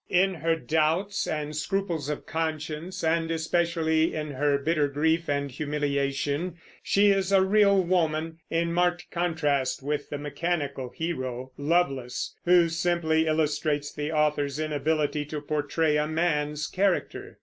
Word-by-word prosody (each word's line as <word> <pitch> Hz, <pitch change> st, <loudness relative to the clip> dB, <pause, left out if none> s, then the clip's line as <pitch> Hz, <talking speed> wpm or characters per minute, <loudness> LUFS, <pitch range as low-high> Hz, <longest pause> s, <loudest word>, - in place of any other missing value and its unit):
In 190 Hz, +2 st, +3 dB
her 165 Hz, 0 st, 0 dB
doubts 160 Hz, +7 st, 0 dB
and 150 Hz, -1 st, -3 dB
scruples 165 Hz, -2 st, -2 dB
of 150 Hz, -, -4 dB
conscience, 160 Hz, +3 st, -3 dB
and 165 Hz, 0 st, +1 dB
especially 165 Hz, -1 st, +1 dB
in 150 Hz, -1 st, -3 dB
her 140 Hz, +1 st, +1 dB
bitter 150 Hz, +1 st, +1 dB
grief 160 Hz, +4 st, 0 dB
and 140 Hz, -1 st, -1 dB
humiliation, 145 Hz, +3 st, -1 dB, 0.3 s
she 200 Hz, +1 st, +4 dB
is 195 Hz, -1 st, +1 dB
a 195 Hz, -1 st, +5 dB
real 200 Hz, 0 st, +4 dB
woman, 165 Hz, -2 st, 0 dB
in 170 Hz, 0 st, 0 dB
marked 175 Hz, 0 st, 0 dB
contrast 150 Hz, -7 st, 0 dB
with 145 Hz, 0 st, -2 dB
the 145 Hz, -, -3 dB
mechanical 145 Hz, -2 st, -3 dB
hero, 130 Hz, -5 st, -4 dB
Lovelace, 140 Hz, -5 st, 0 dB
who 175 Hz, -1 st, +6 dB
simply 165 Hz, -1 st, +1 dB
illustrates 150 Hz, -1 st, 0 dB
the 150 Hz, +1 st, -3 dB
author's 150 Hz, -2 st, +1 dB
inability 150 Hz, 0 st, 0 dB
to 150 Hz, +1 st, -5 dB
portray 150 Hz, +1 st, 0 dB
a 150 Hz, 0 st, +1 dB
man's 150 Hz, -2 st, 0 dB
character. 195 Hz, 0 st, -1 dB
155 Hz, 135 wpm, -27 LUFS, 145-170 Hz, 0.3 s, who